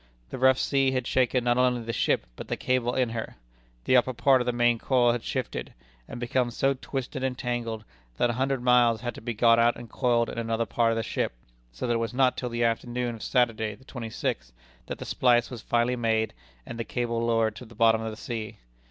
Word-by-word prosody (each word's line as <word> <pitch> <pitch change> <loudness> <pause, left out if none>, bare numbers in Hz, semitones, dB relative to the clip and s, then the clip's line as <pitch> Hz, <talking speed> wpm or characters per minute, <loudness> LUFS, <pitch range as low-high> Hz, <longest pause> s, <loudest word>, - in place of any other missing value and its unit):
The - - -5
rough 130 0 +5
sea 135 -1 +2
had 130 -2 -1
shaken 125 0 +1
not 120 0 +2
only 125 -2 +2
the 115 +1 -4
ship, - - +1
but - - -8
the - - -2
cable 125 -1 0
in 125 -3 +1
her. 115 -1 -5 0.5
The 130 - +3
upper 130 +1 +3
part 130 +1 +4
of 125 - -3
the - - +3
main 120 -1 +2
coil 125 -2 +3
had 120 0 -2
shifted, - - -4 0.3
and - - -7
become 120 0 0
so 135 +3 +1
twisted 130 0 -5
and 130 -1 -1
tangled, 120 -3 -3 0.3
that 120 - +2
a - - -4
hundred 130 +1 -1
miles 120 -3 +4
had 120 -1 -3
to - - -11
be 120 0 -4
got 115 +1 +5
out 120 0 +4
and 120 -2 -11
coiled 120 -3 +1
in - - -5
another 115 0 -1
part 115 +1 +1
of 115 - -1
the 115 - -1
ship, - - -2 0.4
so - - -5
that 120 - +1
it - - +1
was 115 +1 -3
not 130 -1 +3
till 125 - -4
the 120 0 -1
afternoon 120 +1 -1
of 115 - -10
Saturday, 115 -4 0
the 130 - -21
twenty 120 -4 -7
sixth, - - -3 0.4
that - - -5
the - - -7
splice 120 -1 +2
was 120 -3 -7
finally 120 +1 +1
made, 110 -2 0 0.3
and 115 - -8
the - - -1
cable 115 -1 -2
lowered 115 -2 +1
to 125 - -9
the 115 0 -15
bottom 110 0 +4
of 110 - -3
the 110 - -8
sea. 110 -2 -5
120 Hz, 240 wpm, -27 LUFS, 115-125 Hz, 0.5 s, rough